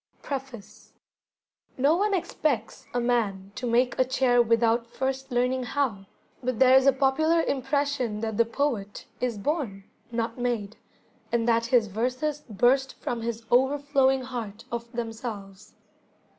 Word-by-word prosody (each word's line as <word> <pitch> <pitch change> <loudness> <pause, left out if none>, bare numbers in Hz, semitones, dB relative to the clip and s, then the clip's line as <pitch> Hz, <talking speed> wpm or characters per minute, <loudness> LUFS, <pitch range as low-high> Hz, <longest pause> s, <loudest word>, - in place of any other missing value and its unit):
Preface 265 -6 -7 0.8
No 280 +5 +4
one 405 +2 +1
expects 290 - -2
a 245 - 0
man 210 -6 0
to 250 - -4
make 245 +2 +2
a - - +6
chair 255 -1 +3
without 230 0 +2
first 265 +2 -3
learning 250 +1 +1
how, 245 -7 -2 0.3
but 255 -2 -2
there 260 +1 +6
is 265 +1 +5
a - - +8
popular 315 +5 +2
impression 270 -4 -1
that 220 -1 -2
the 230 - +4
poet 230 -4 -2
is 245 -3 -1
born, 215 - -2 0.3
not 230 +1 -2
made, 230 -4 -2 0.6
and 235 -1 +1
that 230 0 +2
his 235 -2 +4
verses 255 +8 -2
burst 255 +6 +2
from 235 -1 -3
his 230 0 -4
overflowing 270 +1 +3
heart 230 -4 -6
of 235 0 -5
themselves. 225 -4 -6
245 Hz, 140 wpm, -26 LUFS, 230-265 Hz, 0.8 s, a